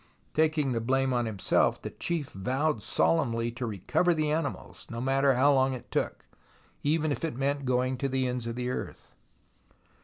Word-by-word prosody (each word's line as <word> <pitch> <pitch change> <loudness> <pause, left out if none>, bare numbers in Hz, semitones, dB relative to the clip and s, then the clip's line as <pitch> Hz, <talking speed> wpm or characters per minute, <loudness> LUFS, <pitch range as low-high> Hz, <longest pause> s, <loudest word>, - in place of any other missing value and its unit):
Taking 155 -3 +2
the 115 -2 0
blame 130 +2 +1
on 120 -1 +1
himself, 105 -4 +1
the - - -6
chief 165 -5 -2
vowed 130 +6 -1
solemnly 115 +9 +1
to 120 +1 -4
recover 115 - +1
the 155 -1 +1
animals, 155 -2 -3
no 115 - -5
matter 135 +1 +3
how 140 +3 +5
long 130 -1 +2
it 125 - -11
took, - - -2 0.6
even 155 +1 +1
if 140 - -3
it 160 -7 -2
meant 140 +1 -1
going 125 0 +1
to 135 - 0
the 130 -1 0
ends 125 -2 -3
of 115 - -3
the 125 0 -2
earth. - - -6
130 Hz, 180 wpm, -29 LUFS, 120-145 Hz, 0.6 s, how